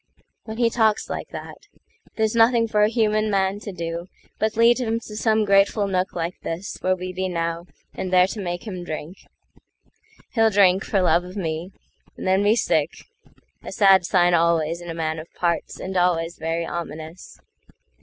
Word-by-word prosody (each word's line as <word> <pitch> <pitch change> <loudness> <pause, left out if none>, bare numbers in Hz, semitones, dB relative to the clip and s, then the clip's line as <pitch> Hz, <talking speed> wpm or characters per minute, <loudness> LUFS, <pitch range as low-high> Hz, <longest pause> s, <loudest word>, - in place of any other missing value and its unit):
When 220 0 -7
he 235 -1 +2
talks 220 -3 +1
like - - -5
that, - - -10 0.5
There's 220 -1 0
nothing 230 0 +4
for 210 -1 +1
a 210 - +5
human 215 -2 +1
man 195 0 0
to 205 - -7
doBut 175 +5 -5
lead 235 +2 +5
him 230 -2 -1
to 215 - -10
some 220 0 +2
grateful 200 +1 +3
nook 185 -1 -1
like 170 +1 -4
thisWhere 185 +2 -3
we 185 0 -6
be 185 0 -2
now, 170 0 -3 0.3
and 185 - -5
there 180 0 +6
to 205 +2 -5
make 175 0 -4
him 185 -5 -6
drink. 160 +2 -7 1.0
He'll 225 -2 +3
drink, 195 -2 +4
for 195 -3 +1
love 175 -1 +3
of 180 +2 -10
me, 165 0 -3 0.5
and - - -7
then 190 +1 +3
be 205 +2 +4
sick;A - - -4
sad 195 -2 +5
sign 175 0 +3
always 170 0 +2
in 175 - -9
a 165 - -5
man 160 -1 -2
of 160 - -11
parts, 170 -1 -2
And 190 +1 -5
always 175 -2 +1
very 165 +1 -2
ominous. 165 0 -7
185 Hz, 175 wpm, -23 LUFS, 170-215 Hz, 1.0 s, there